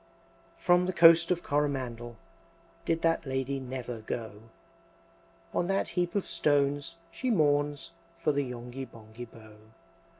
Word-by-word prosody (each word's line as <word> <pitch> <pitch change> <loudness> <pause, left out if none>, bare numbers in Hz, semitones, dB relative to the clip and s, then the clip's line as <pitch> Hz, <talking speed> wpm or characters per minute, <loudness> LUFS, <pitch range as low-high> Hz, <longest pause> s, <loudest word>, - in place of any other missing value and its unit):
X. - - -24
From 180 0 +4
the 185 - -1
Coast 165 0 +7
of 175 -1 0
Coromandel 130 -5 -2 0.7
Did 165 0 0
that 165 -3 +2
Lady 135 +1 -1
never 125 -2 -5
go; 110 0 -6 1.0
On 175 - +1
that 195 +1 0
heap 175 0 -1
of 200 - +1
stones 145 +2 +1 0.2
she 255 - -3
mourns 145 - +2 0.3
For 165 - +1
the 145 0 +1
Yonghy 125 +1 -6
Bonghy 115 +1 -11
Bò. 110 -1 -15
140 Hz, 135 wpm, -29 LUFS, 120-165 Hz, 1.0 s, Coast